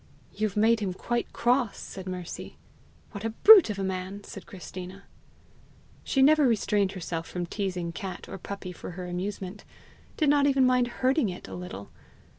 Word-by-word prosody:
"You've 210 -2 -2
made 225 +2 +4
him 190 -4 -2
quite 240 +4 -2
cross!" 245 -2 +1
said 190 -1 -8
Mercy. 180 -2 -6 0.5
"What 205 -1 -7
a 225 - 0
brute 385 - +8
of 210 - -3
a 195 - -2
man!" 190 +1 -4
said 195 - -10
Christina. 185 +1 -9 1.0
She 270 - +2
never 300 0 +6
restrained 205 -4 +1
herself 165 -3 -4
from 180 -1 -4
teasing 180 -2 -3
cat 185 +1 -6
or - - -7
puppy 195 0 -6
for 180 - -8
her 180 - -5
amusement 190 +2 -5 0.5
did 310 - +2
not 285 0 +4
even 270 -2 +4
mind 250 -1 +3
hurting 255 0 +1
it 180 - -8
a - - -9
little. 175 - -8
200 Hz, 170 wpm, -27 LUFS, 185-240 Hz, 1.0 s, brute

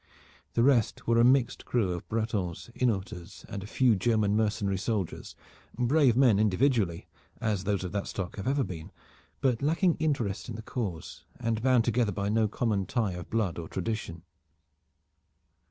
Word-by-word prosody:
The 115 - +3
rest 125 -5 +2
were 115 0 +3
a - - +6
mixed 125 0 +3
crew 110 -7 0
of 85 - -7
Bretons, 110 -3 -2
Hainaulters 95 -7 -2
and 105 -3 -5
a 100 - -8
few 120 0 +3
German 105 0 +2
mercenary 105 -3 0
soldiers, 100 -4 -3 0.4
brave 125 0 +3
men 120 -7 +5
individually, 105 -4 +1 0.3
as 105 -4 -1
those 100 -2 0
of 90 - -4
that 100 -1 -2
stock 95 -3 -5
have 100 - -4
ever 140 +1 +2
been, 80 -7 -7 0.5
but 130 -4 +1
lacking 165 +4 +2
interest 125 -11 -1
in 115 - -5
the 110 - -7
cause, 100 -10 -5
and 115 -2 -1
bound 125 -2 +3
together 120 -2 +1
by 100 -1 -2
no 110 0 +2
common 105 -3 -1
tie 110 -4 0
of 90 -1 -8
blood 105 -7 -1
or 80 - -6
tradition. 95 -4 -4
110 Hz, 165 wpm, -29 LUFS, 95-120 Hz, 0.5 s, a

